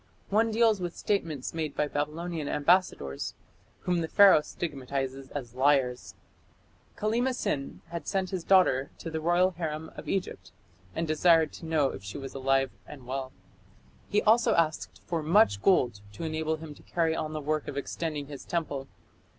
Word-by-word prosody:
One 225 +3 +3
deals 220 -3 +3
with 175 -1 -4
statements 160 -10 -2
made 155 -3 -3
by 150 - +1
Babylonian 155 +2 -3
ambassadors, 145 - +1 0.5
whom 180 -1 0
the 160 - -2
Pharaoh 195 -3 +7
stigmatizes 135 -4 -4
as 125 -5 -6
liars. 130 -2 +1 0.8
Kallima 240 +5 +1
Sin 140 - -3
had 170 0 -6
sent 190 -1 -1
his 185 -3 -3
daughter 155 -9 +4
to 165 - -7
the 160 0 -3
royal 175 +3 +3
harem 160 -2 -4
of - - -8
Egypt, 95 - -3 0.4
and 165 - -1
desired 160 0 +4
to 165 - -9
know 155 -4 +2
if 100 - -9
she 100 +5 -6
was 135 -1 -7
alive 135 0 +1 0.2
and 135 -4 -11
well. 130 +1 -4 0.8
He 210 - +2
also 225 +2 +4
asked 160 -2 0
for 170 -2 -2
"much 160 - +4
gold" 120 - +3
to 105 - -7
enable 160 0 -1
him 155 -1 -9
to - - -17
carry 165 -2 0
on 155 -1 -3
the 155 - -3
work 150 +1 -1
of 140 - -5
extending 150 +1 -3
his 140 -1 -9
temple. 145 -5 -3
155 Hz, 165 wpm, -29 LUFS, 140-175 Hz, 0.8 s, Pharaoh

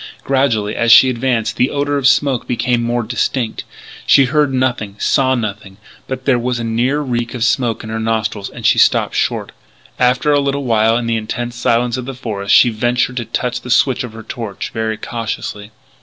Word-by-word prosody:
Gradually, 115 -6 0
as 115 0 +2
she 130 +3 +8
advanced, 120 -2 -1
the 125 - +2
odour 145 0 -1
of 140 -2 +2
smoke 140 -2 +2
became 120 0 0
more 120 0 -1
distinct. 115 +1 -2 0.4
She 135 - +6
heard 145 +1 +1
nothing, 125 -6 -1
saw 130 +4 +2
nothing; 105 -4 -5 0.3
but 130 0 -5
there 130 -3 +3
was 125 0 -2
a 120 - -4
near 120 +6 0
reek 120 -3 -3
of 120 - -2
smoke 120 -2 0
in 110 - -7
her 110 - -3
nostrils 110 -2 -2
and - - -10
she - - +4
stopped - - +3
short. - - -1 0.5
After 125 +4 +2
a 145 - +4
little 140 0 -1
while 115 -2 +2
in 120 - -3
the 115 0 0
intense 120 +2 -4
silence 120 +1 0
of 125 - -5
the 135 0 -6
forest 105 -5 -1
she 125 - +6
ventured 120 +2 -1
to 120 - -2
touch 125 +2 -3
the 125 - -10
switch 130 +1 +2
of 120 -3 -8
her 110 0 -10
torch, 110 -3 -6
very 110 -1 -2
cautiously. 105 -3 -5
120 Hz, 200 wpm, -17 LUFS, 115-130 Hz, 0.5 s, she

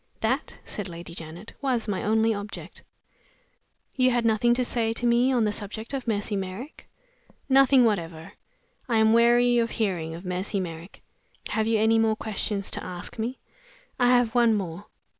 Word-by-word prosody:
"That," 255 +6 -1
said 200 -3 -5
Lady 170 0 -9
Janet, 170 +5 -9
"was 250 -5 0
my 195 -3 -1
only 220 +1 +2
object." 205 0 -8 1.1
"You 255 -1 +4
had 240 -2 +1
nothing 230 +2 +3
to 250 0 0
say 225 -2 0
to 240 - -3
me 240 +2 +3
on 245 -3 +2
the 210 - +1
subject 215 +4 -6
of 265 -3 -4
Mercy 205 -1 -1
Merrick?" 195 +9 -6 0.6
"Nothing 270 -1 +5
whatever. 165 -7 -2 0.6
I 230 - +2
am 220 0 +5
weary 240 +1 +5
of 230 0 +1
hearing 175 -8 -2
of 175 +3 -10
Mercy 185 +3 -2
Merrick. 170 0 -7 0.5
Have 220 0 0
you 225 -1 +2
any 220 +1 +3
more 220 -1 +2
questions 210 -2 -2
to - - -3
ask 180 +5 -7
me?" 240 +4 -2 0.6
"I 245 - +4
have 245 -2 +3
one 235 -2 +4
more." 185 -1 -5
220 Hz, 170 wpm, -26 LUFS, 195-240 Hz, 1.1 s, Nothing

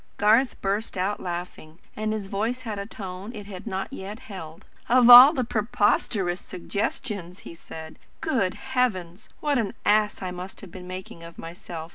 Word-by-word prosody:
Garth 225 +5 +3
burst 200 +1 -2
out 190 +3 -1
laughing, 175 -3 -6 0.2
and 215 0 -2
his 215 -2 -3
voice 220 +6 -2
had 215 -4 -4
a 200 - -5
tone 195 0 -7
it 205 -1 -8
had 195 +1 -9
not 195 +5 -4
yet 205 -3 -6
held. 165 -6 -10 0.2
"Of 245 0 +7
all 250 +4 +12
the 265 -6 -1
preposterous 205 -4 0
suggestions!" 185 -1 -4
he - - -10
said. 160 -1 -10 0.2
"Good 240 - 0 0.2
heavens! 200 -7 -1
What 290 -4 +1
an 215 -4 -2
ass 210 -1 +2
I 185 - -3
must 180 +1 -8
have 195 - -11
been 180 -1 -10
making 185 -2 -8
of 170 0 -11
myself! 165 -1 -8
200 Hz, 170 wpm, -25 LUFS, 180-220 Hz, 0.2 s, all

